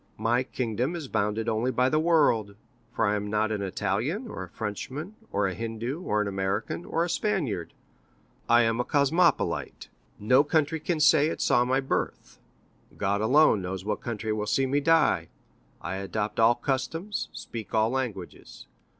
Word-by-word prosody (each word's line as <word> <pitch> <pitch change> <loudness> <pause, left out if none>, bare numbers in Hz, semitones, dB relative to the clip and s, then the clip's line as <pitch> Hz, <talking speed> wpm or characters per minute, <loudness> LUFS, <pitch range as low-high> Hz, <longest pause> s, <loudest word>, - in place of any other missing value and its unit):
My 115 +3 +1
kingdom 125 - -2
is 160 -5 -5
bounded 110 0 -1
only 115 +2 0
by 125 0 +2
the 155 +3 +2
world, 145 -11 +2 0.4
for - - 0
I 105 - +2
am 105 0 -3
not 110 +1 0
an 105 -2 -2
Italian, 115 - -2
or 100 - -7
a 95 - -7
Frenchman, 130 - -5 0.2
or 100 0 +1
a 95 - -1
Hindu, 115 - -4
or 105 - 0
an - - -4
American, 100 - -2
or 165 - 0
a - - -1
Spaniard—I 120 - -2
am 115 +1 +1
a - - +2
cosmopolite. 150 +6 +1 0.3
No 125 +7 +4
country 155 +1 +1
can 160 +1 -2
say 150 0 +5
it - - -3
saw 120 - +3
my 130 +2 +1
birth. 135 - -3 0.6
God 100 0 0
alone 130 -2 +4
knows 95 +1 -5
what 105 -1 -2
country 110 -2 -3
will 105 0 -3
see 135 +5 +2
me 140 +2 +1
die. 165 +1 +3 0.5
I 95 +2 -4
adopt 105 +3 -3
all 115 +1 +5
customs, 160 - -3
speak 115 -2 -7
all 110 +1 +3
languages. 115 -9 -5
115 Hz, 165 wpm, -27 LUFS, 105-145 Hz, 0.6 s, say